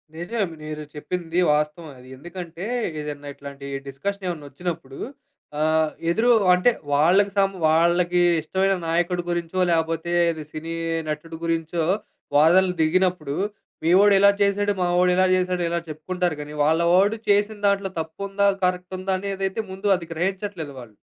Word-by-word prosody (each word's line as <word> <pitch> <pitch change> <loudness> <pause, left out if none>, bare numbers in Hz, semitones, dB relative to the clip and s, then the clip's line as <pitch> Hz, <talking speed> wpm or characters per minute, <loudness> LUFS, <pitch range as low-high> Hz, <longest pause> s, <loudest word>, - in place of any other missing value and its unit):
నిజమే. 195 +6 -2 0.2
మీరు 155 0 -6
చెప్పింది 170 +2 -3
వాస్తవమే. 150 +1 -2
అది 125 +1 -15
ఎందుకంటే, 175 +3 -8 0.4
ఏదన్నా 145 -1 -6
ఇట్లాంటి 140 0 -9 0.2
డిస్‌కషన్ 195 +9 -4
ఏమన్నా 160 -5 -5
ఒచ్చినప్పుడు, 165 -3 -5 0.6
ఆహ్, 155 0 +2 0.2
ఎదురు 230 +7 +3 0.2
అంటే 180 +7 +4 0.2
వాళ్ళకి 180 +8 +4
సం 195 -1 +4 0.2
వాళ్ళకి 170 +2 +3 0.2
ఇష్టమైన 190 +5 +1
నాయకుడి 175 +2 0
గురించో 175 +1 -2
లేపోతే 165 0 0 0.2
అది 160 -2 -7
సినీ 165 +2 -6 0.4
నటుడు 160 +2 -5
గురించో 165 0 -1 0.5
వాదనలు 180 +4 +5
దిగినప్పుడు, 160 -3 +1 0.5
మీవోడు 195 +4 +6
ఇలా 200 +1 +7
చేసాడు. 205 +1 +2
మావోడు 180 0 +3
ఇలా 185 +1 +4
చేసాడు. 180 -1 0
ఇలా 170 0 0
చెప్పుకుంటారు 175 +3 -2
గానీ 150 0 -8
వాళ్ళ 160 +3 +3
వోడు 200 +4 +4
చేసిన 205 +1 +2
దాంట్లో 200 -1 +1
తప్పుందా 200 +5 -1 0.2
కరెక్ట్ 180 +1 -2
ఉందా 190 +1 -1
అనేదైతే 195 +1 -2
ముందు 190 +2 -4
అది 170 - -8
గ్రహించట్లేదు 185 -3 -3
వాళ్ళు. 115 -4 -13
175 Hz, 135 wpm, -23 LUFS, 155-190 Hz, 0.6 s, ఇలా